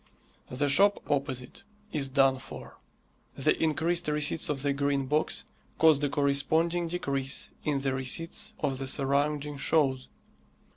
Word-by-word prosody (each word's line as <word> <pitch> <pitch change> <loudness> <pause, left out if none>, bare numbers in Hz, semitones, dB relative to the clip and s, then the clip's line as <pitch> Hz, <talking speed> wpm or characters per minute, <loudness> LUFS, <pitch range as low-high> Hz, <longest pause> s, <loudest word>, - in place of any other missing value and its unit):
The 140 +3 -1
shop 200 +9 +4
opposite 135 - -2 0.3
is 140 -4 -1
done 135 -1 +3
for. 135 - -11 0.6
The - - +2
increased 165 +2 +1
receipts 150 +1 +1
of 140 -2 -2
the 140 -1 +1
Green 140 -1 0
Box 150 +4 0 0.3
caused 155 -3 +5
a 145 - +1
corresponding 155 +5 +1
decrease 140 -5 -2
in 145 -2 0
the 135 -1 0
receipts 165 +10 -3
of 135 -3 -1
the 135 - -4
surrounding 145 +2 +1
shows. 135 -3 +1
145 Hz, 135 wpm, -28 LUFS, 135-155 Hz, 0.6 s, caused